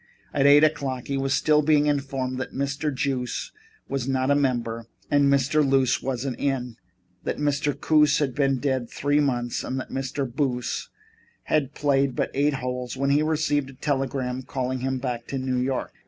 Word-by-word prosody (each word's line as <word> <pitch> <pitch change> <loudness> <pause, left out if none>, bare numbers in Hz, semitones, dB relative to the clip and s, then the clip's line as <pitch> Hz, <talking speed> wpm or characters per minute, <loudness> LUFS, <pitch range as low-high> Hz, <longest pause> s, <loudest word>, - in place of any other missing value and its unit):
At 140 -1 +3
eight 145 +1 +7
o'clock 140 -5 0
he 140 - 0
was 135 0 -1
still 150 +2 +3
being 150 -1 +3
informed 135 -3 -1
that 130 - -5
Mr. 140 +2 -1
Juice 130 -2 -2 0.4
was 135 -2 -2
not 130 0 +1
a - - +5
member, 120 -5 -1 0.2
that 145 0 +4
Mr. 140 +2 +3
Luce 135 -2 +2
wasn't 130 0 -3
in, 125 -4 -2 0.5
that - - -2
Mr. 145 0 0
Coos 150 -1 +4
had 145 -5 0
been 135 0 +2
dead 130 -2 -1
three 145 +1 +1
months 120 -4 0
and 130 - -3
that - - -7
Mr. 135 +1 -2
Boos 125 -1 -2 0.5
had 145 -3 0
played 140 -3 +1
but - - -1
eight 145 +1 +2
holes 125 -1 -4
when 140 +1 +1
he 145 +2 +4
received 155 -3 0
a - - -11
telegram 135 -2 -2
calling 130 0 -3
him 130 +1 -1
back 125 -2 -4
to 135 - -3
New 130 -1 -1
York. 130 +1 -2
135 Hz, 180 wpm, -25 LUFS, 130-145 Hz, 0.5 s, eight